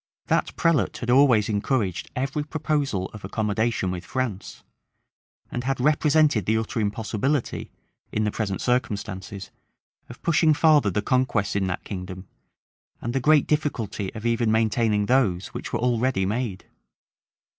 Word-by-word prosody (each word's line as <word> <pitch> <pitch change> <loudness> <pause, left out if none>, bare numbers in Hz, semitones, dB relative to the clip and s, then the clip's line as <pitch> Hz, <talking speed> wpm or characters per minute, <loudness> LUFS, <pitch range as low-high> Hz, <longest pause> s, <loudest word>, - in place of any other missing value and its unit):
That - - +1
prelate 165 -3 +1
had 120 0 -2
always 125 -5 +5
encouraged 100 -5 -1
every 135 +3 -1
proposal 145 -10 -1
of 105 - -10
accommodation 110 -2 -1
with 90 -1 -5
France; 120 -6 -4 0.9
and 120 - -3
had 135 +1 -1
represented 150 - +3
the 110 +1 +3
utter 115 +2 -2
impossibility, 110 +6 -1 0.4
in 110 - 0
the 105 - 0
present 100 -4 -3
circumstances, 100 -6 -2 0.6
of 120 - -11
pushing 160 -2 +4
farther 150 -7 +4
the 100 +2 -1
conquests 125 -6 +1
in 95 -2 +1
that 90 - -3
kingdom, 95 -1 -7 0.7
and 120 - -4
the 135 - +1
great 150 +2 +4
difficulty 115 -10 -1
of 110 +1 -7
even 115 -1 +2
maintaining 110 -1 +2
those 100 -7 +1
which - - -7
were - - 0
already 120 -4 +1
made. 105 -1 -3
115 Hz, 140 wpm, -24 LUFS, 100-135 Hz, 0.9 s, always